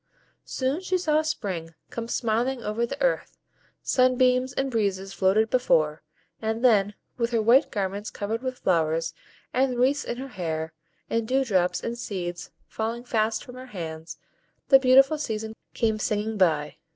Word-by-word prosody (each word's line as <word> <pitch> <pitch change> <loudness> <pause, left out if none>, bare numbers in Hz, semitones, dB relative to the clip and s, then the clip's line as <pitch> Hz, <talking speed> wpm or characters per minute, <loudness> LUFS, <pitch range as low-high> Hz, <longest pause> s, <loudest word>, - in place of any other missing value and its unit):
Soon 265 +6 -1
she 370 0 0
saw 310 -3 +2
Spring 185 - -4 0.2
come 230 -1 -4
smiling 240 +2 0
over 225 +3 -1
the - - -6
earth; - - 0 0.5
sunbeams 255 0 +3
and 270 0 -2
breezes 195 -4 -1
floated 210 +4 +2
before, 155 -12 +2 0.4
and 225 +2 -1
then, 205 -4 +4 0.2
with 235 -1 +1
her 235 -2 +1
white 240 +5 +5
garments 200 +1 -3
covered 220 +3 -3
with 255 -1 -4
flowers, 165 -3 +1 0.4
with 255 0 +2
wreaths 275 +4 +2
in 240 - -4
her 270 +2 -6
hair, 160 -6 -4 0.3
and 230 -1 -1
dew 265 +2 +2
drops 185 -6 +1
and 235 0 -4
seeds 175 -6 -5 0.2
falling 230 +2 -3
fast 220 -2 0
from 250 - -11
her 255 +1 -9
hands 160 -1 -6 0.5
the 270 - +8
beautiful 270 +3 +5
season 220 -5 -3 0.2
came 220 -2 +1
singing 215 +1 -1
by. 155 -6 +1
225 Hz, 155 wpm, -26 LUFS, 195-255 Hz, 0.5 s, the